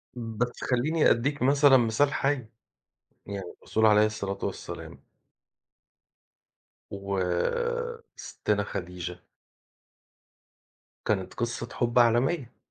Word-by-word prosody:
بس 120 +1 -3
خلّيني 150 +6 +2
أدّيك 140 +5 0
مثلًا 140 +1 +6
مثال 120 +4 +2
حَي، 135 -4 0 0.8
يعني 100 -3 -6
الرسول 110 0 +1
عليه 105 0 +6
الصلاة 100 -2 -3
والسلام - - -6 1.9
وسِتّنا 105 - -2
خديجة 90 -2 -6 1.9
كانت 95 -4 -1
قصة 120 0 -3
حُب 120 0 +1
عالمية. 120 +3 +2
120 Hz, 80 wpm, -27 LUFS, 100-140 Hz, 1.9 s, مثلًا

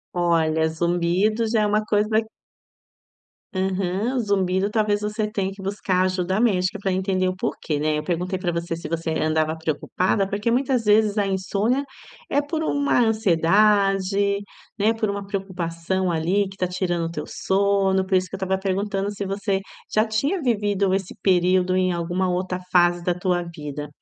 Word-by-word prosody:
Olha, 160 -2 +2
zumbido 175 +7 +1
já 220 -1 +2
é - - +2
uma 210 +1 +1
coisa 210 0 +1 1.4
Aham. 190 +5 -1
Zumbido, 195 -3 +1
talvez, 210 -2 +1
você 210 +1 -2
tenha 195 -3 -1
que 195 - -12
buscar 190 -1 0
ajuda 185 +1 0
médica 195 -3 +1
para 195 - 0
entender 185 0 0
o 185 - -1
porquê, 155 -4 -3
né, 155 0 +1
eu - - -5
perguntei 180 +3 -2
para 180 -2 -1
você 170 0 -3
se 165 -1 -7
você 165 0 -2
andava 155 0 0
preocupada 180 +5 -1
porque 205 +3 -1
muitas 250 0 +1
vezes 210 0 +4
a 200 - +1
insônia 200 +7 0 0.5
é 285 - +2
por 315 +2 -3
uma 285 -4 +1
ansiedade, 200 -1 +3 0.4
né, 215 +3 +3
por 225 -1 -1
uma 200 0 -3
preocupação, 185 -2 -2
ali, 180 +5 +1
que 195 - -12
está 185 - -1
tirando 175 -2 -1
o 165 - -4
teu - - -5
sono, 195 -1 +1
por 190 - 0
isso 185 0 +2
que 195 - -7
eu - - -6
estava 190 0 -1
perguntando 195 +1 -1
se 200 0 -5
você 195 0 -1 0.3
já 215 - +4
tinha 280 - -1
vivido 205 -5 +1
esse 195 -1 -2
período 185 0 +3
em 185 -1 +2
alguma 175 +2 -1
outra 180 0 -2
fase 175 -1 +3
da 175 0 +1
tua 180 0 -1
vida. 150 -3 -7
190 Hz, 170 wpm, -23 LUFS, 175-205 Hz, 1.4 s, vezes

